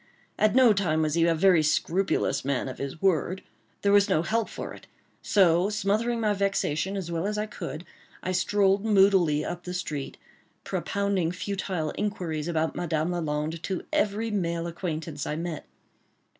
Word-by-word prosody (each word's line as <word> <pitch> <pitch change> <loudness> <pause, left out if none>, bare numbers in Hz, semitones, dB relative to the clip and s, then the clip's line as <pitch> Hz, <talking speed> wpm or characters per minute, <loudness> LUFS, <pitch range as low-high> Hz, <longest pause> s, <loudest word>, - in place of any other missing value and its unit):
At 215 +1 +3
no 255 -4 +7
time 160 -6 +1
was 155 -1 0
he 170 +1 +3
a 165 - +3
very 175 0 +5
scrupulous 170 +5 +1
man 135 -1 -1
of 130 - -7
his 140 +3 -5
word. 185 0 +1 0.4
There 200 - +3
was 205 +1 +5
no 160 -4 +2
help 225 +4 0
for - - -6
it; - - -14 0.3
so 180 -1 +3
smothering 215 +3 0
my 215 -2 +2
vexation 195 -2 -1
as 175 -3 -4
well 170 +3 -1
as 210 0 -2
I 210 - 0
could, 175 -5 -7 0.4
I 185 - -1
strolled 195 +1 +2
moodily 195 -8 +4
up 175 0 -5
the 180 +1 -5
street, 150 -6 -4 0.5
propounding 200 -4 -1
futile 180 -4 -3
inquiries 175 -7 -2
about 160 -1 -1
Madame 160 -1 -1
Lalande 155 -1 -2
to 185 -1 -3
every 215 +2 0
male 170 -4 -1
acquaintance 160 -3 -4
I 150 - -2
met. 165 0 -5
180 Hz, 165 wpm, -27 LUFS, 160-200 Hz, 0.5 s, no